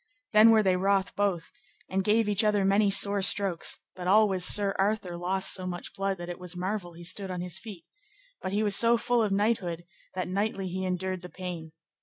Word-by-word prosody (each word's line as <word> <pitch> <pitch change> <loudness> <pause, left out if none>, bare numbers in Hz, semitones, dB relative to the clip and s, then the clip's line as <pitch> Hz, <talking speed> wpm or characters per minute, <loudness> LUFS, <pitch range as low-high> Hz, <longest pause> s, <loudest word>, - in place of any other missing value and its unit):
Then 215 +1 +7
were 220 -1 +5
they 185 -2 +2
wroth 195 +1 0
both, 195 -5 -2 0.4
and 190 +1 -2
gave 215 +2 +2
each 205 +1 +2
other 210 -2 +1
many 200 +1 +3
sore 200 0 +4
strokes, 190 -3 +1 0.2
but 180 -1 -6
always 195 -2 +3
Sir 200 +1 +5
Arthur 195 -3 -1
lost 185 +2 0
so 185 -1 -4
much 175 -1 -7
blood 195 0 -2
that 175 0 -8
it 175 - -7
was 180 -1 -7
marvel 180 -1 -4
he 170 +1 -12
stood 190 +3 -2
on 180 -1 -4
his 180 0 -4
feet, 195 -6 -11 0.6
but 185 - -4
he 205 +2 0
was 205 -2 +2
so 235 +2 +4
full 240 +1 0
of 215 -2 0
knighthood 195 -5 -1 0.3
that 185 - -3
knightly 195 +1 -2
he 185 +1 -4
endured 185 0 -3
the 180 - -10
pain. 175 -4 -8
195 Hz, 210 wpm, -27 LUFS, 180-205 Hz, 0.6 s, Then